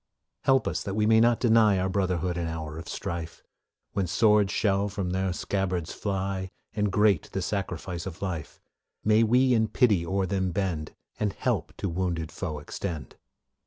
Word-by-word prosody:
Help 135 Hz, -1 st, +4 dB
us -, -, -1 dB
that 100 Hz, -1 st, -4 dB
we 105 Hz, 0 st, +2 dB
may 110 Hz, +1 st, +5 dB
not 120 Hz, 0 st, +4 dB
deny 110 Hz, -4 st, +5 dB
Our 95 Hz, 0 st, +1 dB
brotherhood 90 Hz, -2 st, 0 dB
in 85 Hz, -1 st, -2 dB
hour 80 Hz, -1 st, -5 dB
of 85 Hz, -, -8 dB
strife; 85 Hz, -1 st, -5 dB, 0.5 s
When 95 Hz, -2 st, 0 dB
swords 105 Hz, +2 st, +4 dB
shall 100 Hz, -1 st, +1 dB
from 95 Hz, -3 st, -3 dB
their 95 Hz, 0 st, 0 dB
scabbards 90 Hz, -2 st, -2 dB
fly, 95 Hz, -1 st, -2 dB, 0.2 s
And 105 Hz, -1 st, 0 dB
great 105 Hz, -5 st, +3 dB
the 95 Hz, -, -1 dB
sacrifice 90 Hz, -2 st, -3 dB
of 90 Hz, -, -7 dB
life, 85 Hz, -6 st, -4 dB, 0.5 s
May 110 Hz, +1 st, +5 dB
we 125 Hz, +3 st, +4 dB
in 110 Hz, -2 st, +3 dB
pity 110 Hz, -8 st, +3 dB
o'er 95 Hz, +2 st, 0 dB
them 95 Hz, 0 st, 0 dB
bend, 90 Hz, -6 st, -2 dB, 0.2 s
And 105 Hz, -2 st, 0 dB
help -, -, -2 dB
to -, -, -2 dB
wounded 85 Hz, -3 st, -2 dB
foe 80 Hz, -5 st, -4 dB
extend. 75 Hz, -1 st, -5 dB
95 Hz, 170 wpm, -27 LUFS, 85-105 Hz, 0.5 s, may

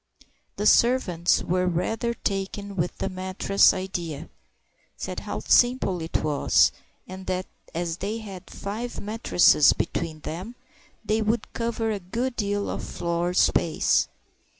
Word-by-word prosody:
The 205 Hz, -, -3 dB
servants 205 Hz, -9 st, +3 dB
were 180 Hz, +1 st, +1 dB
rather 225 Hz, +7 st, -1 dB
taken 200 Hz, 0 st, -3 dB
with 175 Hz, -1 st, -2 dB
the -, -, -2 dB
mattress 185 Hz, +1 st, +3 dB
idea, 170 Hz, -5 st, -5 dB, 0.7 s
said -, -, -4 dB
how -, -, -5 dB
simple 240 Hz, -8 st, +3 dB
it 160 Hz, -, -2 dB
was, 150 Hz, -2 st, +3 dB, 0.4 s
and 185 Hz, 0 st, -9 dB
that, 185 Hz, 0 st, -1 dB, 0.3 s
as 170 Hz, -1 st, -2 dB
they 205 Hz, +4 st, -3 dB
had 195 Hz, -5 st, -9 dB
five 220 Hz, +5 st, -5 dB
mattresses 205 Hz, -8 st, +4 dB
between 160 Hz, -2 st, -3 dB
them, 185 Hz, +12 st, -6 dB, 0.5 s
they 215 Hz, +1 st, +1 dB
would 220 Hz, +1 st, -1 dB
cover 230 Hz, -1 st, -1 dB
a 205 Hz, -, -2 dB
good 235 Hz, +8 st, -3 dB
deal 205 Hz, -2 st, -1 dB
of -, -, -4 dB
floor 170 Hz, +1 st, -2 dB
space. 165 Hz, -3 st, +3 dB
190 Hz, 130 wpm, -25 LUFS, 175-220 Hz, 0.7 s, mattresses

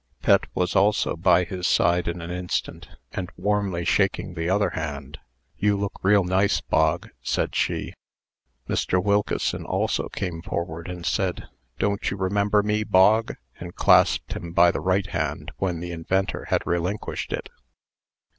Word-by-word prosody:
Pet -, -, +4 dB
was 90 Hz, +1 st, 0 dB
also 100 Hz, +2 st, +3 dB
by 90 Hz, +1 st, +4 dB
his 90 Hz, +1 st, -3 dB
side 85 Hz, 0 st, +2 dB
in 85 Hz, 0 st, -3 dB
an 85 Hz, -, -6 dB
instant, 90 Hz, 0 st, -3 dB, 0.2 s
and 90 Hz, -1 st, -4 dB
warmly 95 Hz, -3 st, -1 dB
shaking 95 Hz, -1 st, +1 dB
the 80 Hz, 0 st, -2 dB
other 100 Hz, +2 st, +2 dB
hand. 75 Hz, -2 st, -5 dB, 0.4 s
"You 105 Hz, -1 st, +2 dB
look 100 Hz, 0 st, -2 dB
real 100 Hz, +1 st, +4 dB
nice, 95 Hz, +3 st, +2 dB
Bog," 80 Hz, +2 st, +1 dB
said -, -, -1 dB
she. -, -, -1 dB, 0.7 s
Mr. 90 Hz, -, 0 dB
Wilkeson 100 Hz, +2 st, 0 dB
also -, -, -1 dB
came 85 Hz, -3 st, -4 dB
forward, 85 Hz, -1 st, -4 dB
and 90 Hz, -1 st, -7 dB
said, 95 Hz, -2 st, -1 dB, 0.3 s
"Don't 100 Hz, 0 st, 0 dB
you 100 Hz, -, -4 dB
remember 100 Hz, +2 st, +1 dB
me, 105 Hz, +1 st, 0 dB
Bog?" 105 Hz, +4 st, +4 dB, 0.2 s
and 85 Hz, 0 st, -8 dB
clasped -, -, +4 dB
him 85 Hz, 0 st, -7 dB
by 85 Hz, 0 st, +6 dB
the -, -, -4 dB
right 95 Hz, +1 st, +1 dB
hand 80 Hz, -7 st, -3 dB
when 90 Hz, -3 st, -2 dB
the 90 Hz, 0 st, -5 dB
inventor 95 Hz, +3 st, -1 dB
had -, -, 0 dB
relinquished 90 Hz, +4 st, -2 dB
It. -, -, -4 dB
90 Hz, 155 wpm, -24 LUFS, 85-100 Hz, 0.7 s, by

